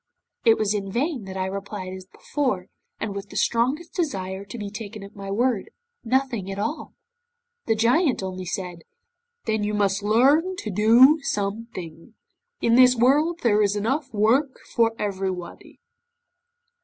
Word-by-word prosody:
'It 225 -1 +6
was 215 -1 +1
in 195 -2 -3
vain 260 - -1
that 190 0 -7
I 185 - -1
replied 195 -1 -5
as 185 0 -9
before, 210 -7 -3 0.3
and 210 - -3
with 200 0 -7
the - - -12
strongest 265 +8 0
desire 195 - -3
to 200 +4 -9
be 205 -2 -5
taken 210 0 -7
at 200 +1 -12
my 195 -1 -7
word, 230 +1 0 0.3
"Nothing 245 -5 0
at 195 - -5
all." 225 +10 -4 0.7
'The 225 - +3
Giant 245 - +2
only 185 -1 -5
said, 180 -1 -4 0.7
'"Then 220 -1 0
you 210 0 -1
must 200 -1 +1
learn 275 - +3
to 215 - -5
do 235 - +6
something; 200 - -5 0.5
in 230 - +2
this 255 0 +7
world 295 +8 +3
there 215 -3 +4
is 205 0 +2
enough 265 +7 -1
work 240 +6 +2
for 230 -1 +2
everybody." 190 -4 -5
215 Hz, 155 wpm, -24 LUFS, 195-255 Hz, 0.7 s, this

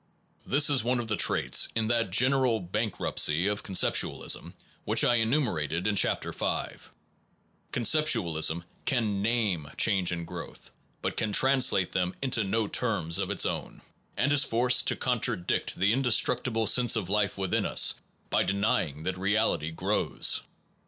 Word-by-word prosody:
This 145 +2 +3
is 140 -5 +2
one 125 +1 0
of 120 - -4
the 110 -1 -1
traits - - +2
in 110 -1 0
that 115 -3 +1
general 125 +3 +2
bank 105 +4 -4
ruptcy 80 +4 +1
of 105 0 -1
conceptualism, 95 -3 -1 0.3
which - - +1
I 120 - +3
enumerated 105 - -1
in 105 -1 0
Chapter - - 0
V - - -3 0.9
conceptualism 85 - +1 0.2
can 110 -7 -1
name 105 -9 -1
change 95 -5 +2
and 85 -1 -4
growth, - - -10 0.3
but - - -3
can 110 - -1
translate 130 -5 +3
them 90 0 -2
into 130 -5 +1
no 105 +2 -1
terms 100 -9 -1
of - - -2
its - - 0
own, - - -5 0.3
and 140 +4 +1
is 145 - +4
forced 125 +2 +2
to - - +2
con 125 -2 -1
tradict 105 -7 -2
the 100 +4 +1
indestructible 125 -2 +1
sense 120 +2 +4
of 105 -6 -2
life 100 0 0
within 95 -2 -1
us - - +4 0.4
by - - +2
denying 95 -7 -1
that 90 +1 -4
reality 100 -5 0
grows. 80 - 0
110 Hz, 150 wpm, -27 LUFS, 95-120 Hz, 0.9 s, is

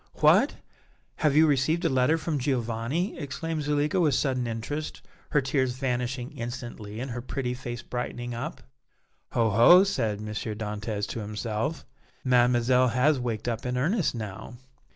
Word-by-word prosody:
"What! - - +4 0.6
have 150 -2 +2
you 155 +1 +7
received 155 +3 +2
a - - +4
letter 130 +5 +3
from 155 -2 -2
Giovanni?" 125 - -1
exclaimed 155 +2 -3
Zuleika, 150 +4 +1
with 150 -6 +3
sudden 130 -3 0
interest, 120 +7 -4 0.3
her 150 - +3
tears 130 -1 0
vanishing 125 -1 -2
instantly 115 -3 -6
and 130 +1 -4
her 120 +1 -4
pretty 125 0 -3
face 120 -1 -6
brightening 120 0 -4
up. 135 +7 -5 0.7
"Ho! 115 -2 +2
ho!" 120 - +8
said 115 - -1
M. 105 - -7
Dantès 105 -1 -3
to - - -4
himself, 110 +7 -3 0.4
"Mademoiselle 125 0 +4
has 130 +4 +2
waked 115 -2 -3
up 115 -2 -2
in 125 0 -2
earnest 170 - +1
now." 110 +1 -6
125 Hz, 150 wpm, -27 LUFS, 115-145 Hz, 0.7 s, ho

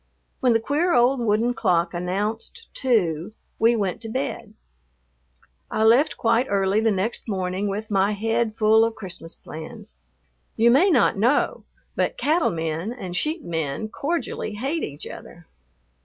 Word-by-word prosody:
When 250 -2 +3
the 225 - +3
queer 295 +9 +1
old 245 +2 +4
wooden 230 +1 +1
clock 170 -6 +1
announced 210 - -3
two 200 - 0 0.3
we 230 +2 +4
went 200 -1 -2
to 225 - -6
bed. 260 0 -4 1.1
I 220 - 0
left 245 +8 +4
quite 230 +3 +2
early 195 +1 +2
the 225 - +3
next 210 +3 -2
morning 190 0 -2
with 210 +2 -4
my 195 +1 +2
head 225 +1 0
full 220 +1 +5
of 230 0 0
Christmas 180 -4 -8
plans. 155 - -10 0.6
You 235 +2 +5
may 320 +11 +5
not 250 - +3
know, 245 +7 +1 0.3
but - - 0
cattle 330 -6 +2
men 165 +4 -3
and 185 -8 -6
sheep 310 - -1
men 160 +5 -3
cordially 285 -6 -3
hate 275 +9 -2
each 145 +1 -6
other. 175 0 -11
220 Hz, 150 wpm, -23 LUFS, 190-245 Hz, 1.1 s, full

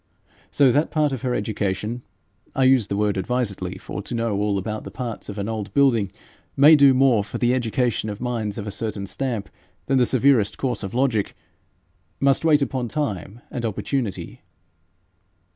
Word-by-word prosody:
So 140 -3 +4
that 150 +5 +2
part 150 -3 +1
of 130 - -4
her 125 -2 -1
education 105 +2 -2 0.5
I 135 - +2
use 130 -5 +4
the 100 - -2
word 105 -1 +1
advisedly, 100 -5 -2
for 100 - -6
to 120 - -5
know 115 -2 -1
all 100 0 0
about 110 +2 -4
the - - -7
parts 120 -5 -6
of 105 - -6
an 100 0 -3
old 110 -3 -4
building 120 -9 +3 0.5
may 150 +3 +8
do 140 -3 +6
more 130 -5 +4
for 105 - -6
the 120 0 +2
education 120 -2 0
of 105 - -6
minds 115 -4 -3
of 105 - -5
a 105 - -4
certain 105 -1 -4
stamp 115 -1 -3 0.4
than 135 -1 +2
the 125 - +3
severest 130 -5 +3
course 130 -2 -2
of 100 +1 -6
logic 125 -6 0 0.8
must 135 +1 +2
wait 150 -3 +4
upon 130 -3 -2
time 115 -5 -4
and 120 - -4
opportunity. 115 0 -3
115 Hz, 175 wpm, -23 LUFS, 105-130 Hz, 0.8 s, may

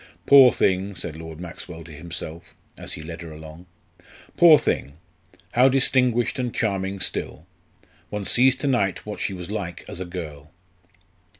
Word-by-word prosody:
"Poor 135 -3 +8
thing," 95 0 0
said 85 -3 -5
Lord 80 0 -9
Maxwell 85 -1 -9
to 80 - -13
himself 85 +2 -8 0.2
as - - -6
he 80 - -7
led 80 +1 -8
her 85 -1 -8
along 80 +3 -11 0.7
"poor 165 -3 +8
thing! 70 - -2 0.6
how 125 +2 +5
distinguished 125 -2 +2
and 125 -2 -1
charming 95 -3 -1
still! 85 -3 -4 0.6
One 105 -1 -4
sees 130 +4 +4
to 140 - -3
night 100 -8 0
what 105 0 -6
she 100 - -2
was 90 +1 -8
like 90 -5 -5
as - - -7
a 95 - -4
girl." 80 -4 -8
95 Hz, 160 wpm, -23 LUFS, 80-120 Hz, 0.7 s, Poor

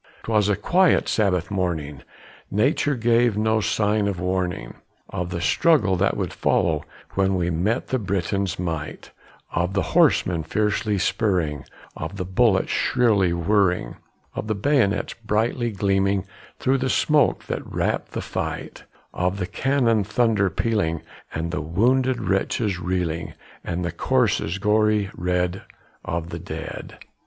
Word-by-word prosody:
'Twas 105 -2 +2
a 105 - +3
quiet 180 - +3
Sabbath 90 -5 +1
morning; 80 -8 -2 0.5
nature 135 +7 +1
gave 115 -1 +2
no 110 +1 +2
sign 105 0 +1
of 95 -3 -2
warning 90 -8 -2 0.4
Of 90 -2 -3
the 90 -1 -3
struggle 140 - +3
that 100 +3 +1
would 95 -4 -2
follow 80 -3 +1 0.3
when 95 0 +1
we 90 -1 0
met 100 +10 -1
the 130 - 0
Briton's 100 -1 -1
might; 80 -4 -5 0.4
Of 85 +2 -1
the 95 - +2
horsemen 85 -3 +3
fiercely 105 +4 0
spurring, 90 - 0 0.3
of 80 +5 -6
the 90 - -3
bullets 95 +1 +2
shrilly 110 -8 +2
whirring, 90 - +1 0.4
Of - - -5
the 110 - 0
bayonets 105 -3 +1
brightly 115 +3 0
gleaming 100 -1 +1 0.3
through 135 +1 +1
the 130 0 -1
smoke 150 +2 +2
that - - -3
wrapped - - -1
the - - -2
fight; - - -5 0.3
Of 90 +2 -1
the 90 - -2
cannon 120 -2 +1
thunder 110 -1 +2
pealing, 90 -5 -1 0.3
and 85 +2 -3
the 80 - -2
wounded 125 - +2
wretches 95 0 0
reeling, 85 -2 -2 0.3
And 90 0 -3
the 85 - -2
corses 100 -3 +1
gory 105 -1 +2
red 90 +1 -1 0.4
of 85 +1 -4
the - - -5
dead. - - -7
100 Hz, 140 wpm, -23 LUFS, 90-110 Hz, 0.5 s, a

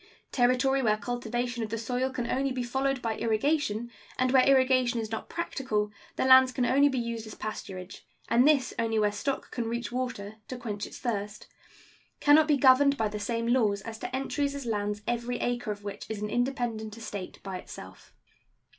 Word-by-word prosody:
Territory 255 +2 +3
where 215 -3 +2
cultivation 240 +1 -3
of 220 - -3
the 225 - -2
soil 250 +3 -1
can 250 -2 -3
only 270 +3 0
be 255 -1 -2
followed 265 +1 -1
by 225 -1 -1
irrigation, 235 0 0 0.3
and 255 0 +2
where 260 -1 +6
irrigation 255 -3 +4
is 220 -1 -4
not 225 - -5
practicable 235 -11 -2 0.2
the - - 0
lands 260 0 +8
can 255 -1 0
only 280 +3 +4
be 265 - -2
used 235 -2 -3
as 215 - -9
pasturage, 190 -3 -6 0.3
and 245 +4 +4
this 280 -4 +3
only 225 -1 0
where 210 -1 +3
stock 265 +7 -3
can 235 -2 -3
reach 235 -1 -3
water 230 -5 -4
(to 255 - -6
quench 210 -4 -4
its - - -10
thirst), 210 -4 -4 0.7
can 290 - +5
not 310 +1 +6
be 295 -2 +4
governed 275 +1 +5
by 220 - +1
the 210 0 -5
same 230 +2 -2
laws 215 -5 +2
as 220 +1 -8
to - - -4
entries 280 +1 -1
as 280 -2 -6
lands 210 -2 -2
every 240 +1 -1
acre 240 -2 -2
of 205 -1 -4
which 205 -1 -7
is 220 -2 -4
an 210 0 -4
independent 240 -4 -2
estate 205 -4 -6
by 190 -2 -4
itself. - - -11
240 Hz, 195 wpm, -28 LUFS, 215-260 Hz, 0.7 s, lands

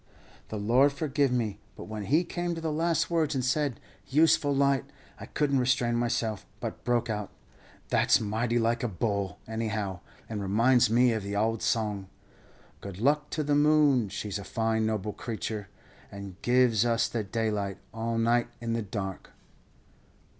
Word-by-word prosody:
"The 110 - -4
Lord 120 +7 +4
forgive 140 -2 0
me, 110 -5 -1 0.2
but - - -8
when 105 -1 -6
he 155 - +3
came 175 0 -3
to - - -5
the 160 -1 -2
last 165 +2 0
words 160 -4 +1
and 130 -2 0
said, 140 -1 0 0.3
'useful 150 0 +4
light,' 140 0 +2 0.3
I - - -8
couldn't 140 -3 +1
restrain 125 -1 +2
myself, 115 -3 -1 0.2
but - - -6
broke 120 -1 +1
out, 105 -3 -3 0.6
'That's - - +4
mighty 110 +3 -1
like 115 0 +1
a 120 - 0
bull, 100 -1 -2
anyhow, 110 -4 -3 0.3
and 105 -2 -4
reminds 115 +5 +3
me 120 +1 +4
of 110 - -2
the 100 +1 -4
ould 110 +2 0
song, 105 -4 -1 0.7
"'Good 100 -2 -8
luck 150 +5 +2
to 155 - -2
the 145 0 0
moon, 145 -6 +4
she's 105 +1 -4
a - - -7
fine 110 +1 0
noble 105 -1 -2
creature, 110 -3 -5 0.4
And 100 -1 -9
gives 120 -3 +3
us 115 -1 +2
the 115 -2 -2
daylight 105 -2 -2 0.2
all 115 +1 -2
night 120 +1 +2
in 115 -1 -2
the 115 - 0
dark.' 95 -2 -5
115 Hz, 165 wpm, -28 LUFS, 105-135 Hz, 0.7 s, Lord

